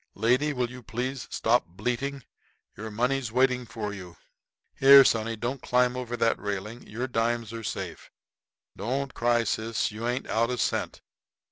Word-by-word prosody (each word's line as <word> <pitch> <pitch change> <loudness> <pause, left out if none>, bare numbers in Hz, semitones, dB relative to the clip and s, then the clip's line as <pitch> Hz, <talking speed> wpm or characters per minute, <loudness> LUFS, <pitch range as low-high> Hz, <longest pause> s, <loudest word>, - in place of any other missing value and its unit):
Lady, 125 +8 +2
will 125 -3 -2
you 125 0 -9
please 125 +2 -4
stop 120 +2 +2
bleating? 125 +9 -3 0.5
Your 110 +1 -6
money's 125 +2 -1
waiting 125 0 +2
for 110 -2 -5
you. 90 -4 -10 0.6
Here, 135 0 +9
sonny, 115 0 +1
don't 120 +4 -4
climb 125 0 +2
over 120 -1 -4
that 115 0 +2
railing; 105 +3 -5
your 120 +5 -4
dimes 115 -1 -1
are 115 0 -6
safe. - - -5 0.7
Don't 130 +6 -3
cry, 120 0 +2
sis; 110 +1 -1
you 110 +3 -4
ain't 125 +2 -1
out 115 +1 +1
a 125 - -2
cent. - - -2
120 Hz, 155 wpm, -27 LUFS, 110-125 Hz, 0.7 s, Here